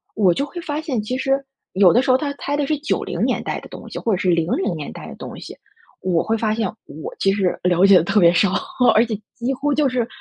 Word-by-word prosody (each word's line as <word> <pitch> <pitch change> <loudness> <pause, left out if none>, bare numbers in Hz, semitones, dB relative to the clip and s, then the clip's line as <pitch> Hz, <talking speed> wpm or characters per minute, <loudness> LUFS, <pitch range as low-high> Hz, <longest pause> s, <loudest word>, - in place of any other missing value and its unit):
我 195 -5 +4
就 280 - -1
会 345 +4 -8
发 300 -2 -3
现， 275 -8 -2
其 250 +5 -3
实 270 +1 0 0.3
有 190 -2 +6
的 245 - +4
时 260 - +1
候， 255 - +5
他 285 +1 -3
猜 285 0 -3
的 290 -1 -1
是 305 - 0
90 300 - -2
年 - - -1
代 - - -3
的 - - -12
东 - - -10
西， - - -7
或 230 - -1
者 - - +1
是 185 - 0
00 170 +1 0
年 150 -2 -6
代 - - -9
的 - - -9
东 - - -9
西， - - -9 0.5
我 180 -3 +1
会 225 - 0
发 215 -1 0
现 225 -2 0 0.2
我 155 - -8
其 195 - +3
实 195 -3 0
了 180 +1 +4
解 195 0 +7
得 165 - +3
特 200 +4 +2
别 170 -2 +6
少， 180 +2 +3 0.4
而 225 - +5
且 225 -2 -3 0.2
几 245 +3 -2
乎 280 +3 -1
就 285 0 +2
是 245 -3 -1
220 Hz, 275 characters per minute, -21 LUFS, 185-270 Hz, 0.5 s, 解